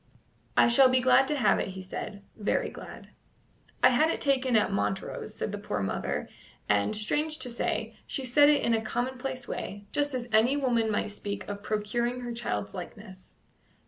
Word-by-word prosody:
"I - - +7
shall 260 +2 +6
be 255 0 +4
glad 260 +1 +5
to 300 - 0
have 215 -8 +3
it," - - -1
he - - -5
said 200 +2 -7
"very 210 -2 -1
glad." - - -11 0.7
"I - - +9
had 255 +6 +3
it - - -1
taken 265 -3 +2
at 215 - +3
Montrose," 100 -1 -3
said - - -3
the - - -5
poor - - -3
mother; - - -2 0.4
and, 105 - +2
strange 300 +9 0
to 250 - -2
say, 235 - -2
she 270 - -3
said 290 +4 +5
it 295 -1 +3
in 235 - +2
a 225 - +2
commonplace 250 +2 -3
way, 205 0 -5
just 290 -2 +1
as 245 -1 -3
any 230 +6 +4
woman 235 -5 +1
might 210 0 -1
speak 205 0 -5
of 200 0 -5
procuring 235 +4 -1
her 240 -1 -5
child's 105 - -3
likeness. 190 -4 -10
235 Hz, 185 wpm, -28 LUFS, 210-260 Hz, 0.7 s, I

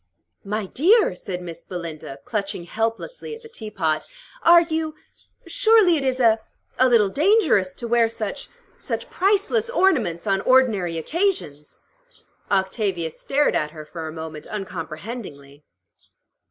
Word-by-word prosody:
"My 210 +1 -2
dear," 370 - +3
said 180 0 -6
Miss 170 -1 -8
Belinda, 165 -6 -7
clutching 200 -5 -3
helplessly 225 - -3
at 460 - -15
the - - -10
teapot, 195 - -3 0.3
"are 340 0 +7
you 320 -1 -3 0.5
surely 445 -7 +4
it 285 - -1
is 260 -1 0
a 225 -3 +4 0.4
a 260 0 +5
little 220 -5 +4
dangerous 305 - +3
to 235 - -6
wear 235 -1 +3
such 225 +4 -5 0.3
such - - -4
priceless 420 +4 +1
ornaments 265 - +1
on 195 -2 +1
ordinary 215 -11 +3
occasions." 165 - -2 0.7
Octavia 190 -3 0
stared 285 - 0
at 150 - 0
her 155 - -8
for 160 +1 -7
a - - -5
moment 160 -1 -8
uncomprehendingly. 165 - -7
215 Hz, 130 wpm, -23 LUFS, -, 0.7 s, are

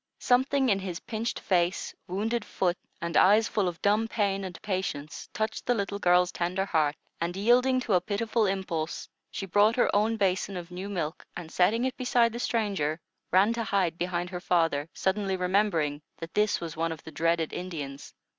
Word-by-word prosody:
Something 265 +1 +2
in 195 -2 +3
his 185 -3 -5
pinched 225 +1 -3
face, 180 -1 0
wounded 215 +5 -1
foot, 180 -4 0 0.3
and 170 0 -3
eyes 215 +4 +6
full 205 -3 0
of 175 -2 -4
dumb 210 +2 +3
pain 200 -3 0
and 180 -3 -7
patience, 185 -7 -4
touched 220 0 -3
the 245 - +3
little 200 -1 -2
girl's 180 -1 +4
tender 180 +2 -1
heart, 155 -6 +1 0.2
and, 175 +2 -2
yielding 250 +5 +4
to 225 - -1
a 180 - +4
pitiful 220 +3 0
impulse, 175 -4 -3 0.2
she 195 - -5
brought 205 +4 +4
her 245 - +2
own 220 +2 +2
basin 195 -1 0
of 175 0 -8
new 185 +3 -5
milk 170 -4 -3
and, 165 -2 -8
setting 220 +7 +2
it 260 - -1
beside 240 -2 +2
the 235 - -5
stranger, 195 -11 -1 0.3
ran 195 +5 +4
to 230 0 -2
hide 190 -5 0
behind 175 0 -2
her 180 -1 -5
father, 165 -5 +1
suddenly 195 0 0
remembering 180 -6 +1 0.2
that 165 0 -8
this 210 0 +2
was 165 -2 -6
one 165 +1 -1
of 160 - -7
the 160 - -9
dreaded 165 -1 0
Indians. 150 -6 -6
190 Hz, 185 wpm, -28 LUFS, 170-215 Hz, 0.3 s, eyes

